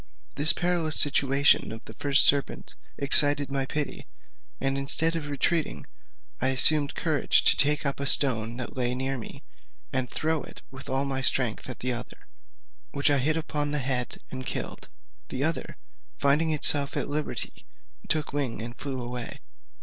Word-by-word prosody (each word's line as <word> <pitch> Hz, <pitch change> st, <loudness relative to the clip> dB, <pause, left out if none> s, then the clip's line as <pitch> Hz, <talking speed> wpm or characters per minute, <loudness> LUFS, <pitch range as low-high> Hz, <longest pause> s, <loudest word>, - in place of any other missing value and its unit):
This 150 Hz, +3 st, +5 dB
perilous 175 Hz, -3 st, +1 dB
situation 140 Hz, -1 st, +3 dB
of 110 Hz, +1 st, -9 dB
the -, -, -11 dB
first 140 Hz, 0 st, +5 dB
serpent 140 Hz, -1 st, +2 dB, 0.2 s
excited 145 Hz, 0 st, +3 dB
my 135 Hz, -1 st, -2 dB
pity, 150 Hz, 0 st, -4 dB, 0.5 s
and 135 Hz, 0 st, -1 dB
instead 160 Hz, +4 st, +3 dB
of 150 Hz, -3 st, -5 dB
retreating 155 Hz, +3 st, -1 dB, 0.6 s
I 130 Hz, -, +2 dB
assumed 145 Hz, +2 st, +3 dB
courage 155 Hz, -4 st, +1 dB
to -, -, +5 dB
take 150 Hz, +1 st, +3 dB
up 140 Hz, 0 st, -2 dB
a 140 Hz, -, -2 dB
stone 115 Hz, -5 st, +3 dB
that 125 Hz, -, -6 dB
lay 125 Hz, -1 st, -1 dB
near 135 Hz, +1 st, -2 dB
me, 110 Hz, -, -9 dB, 0.5 s
and 130 Hz, -2 st, -2 dB
to -, -, -13 dB
throw 160 Hz, 0 st, -1 dB
it -, -, -12 dB
with 135 Hz, +1 st, -11 dB
all 135 Hz, +1 st, -1 dB
my 135 Hz, -1 st, -3 dB
strength 125 Hz, -2 st, 0 dB
at 125 Hz, -, -8 dB
the 125 Hz, 0 st, -1 dB
other, 120 Hz, +1 st, -7 dB, 0.7 s
which 140 Hz, +1 st, +1 dB
I 140 Hz, -, +2 dB
hit 155 Hz, +5 st, 0 dB
upon 150 Hz, -2 st, -3 dB
the 150 Hz, -, -2 dB
head 130 Hz, -3 st, -2 dB
and 130 Hz, 0 st, -6 dB
killed. -, -, -6 dB, 0.4 s
The 130 Hz, +1 st, -3 dB
other, 160 Hz, +2 st, -3 dB, 0.4 s
finding 145 Hz, +3 st, +2 dB
itself 145 Hz, -2 st, +1 dB
at -, -, -1 dB
liberty, 150 Hz, +1 st, -5 dB, 0.4 s
took 155 Hz, -3 st, -1 dB
wing 140 Hz, -5 st, -3 dB
and 120 Hz, +2 st, -7 dB
flew 135 Hz, -2 st, -6 dB
away. 120 Hz, 0 st, -6 dB
140 Hz, 170 wpm, -26 LUFS, 130-150 Hz, 0.7 s, This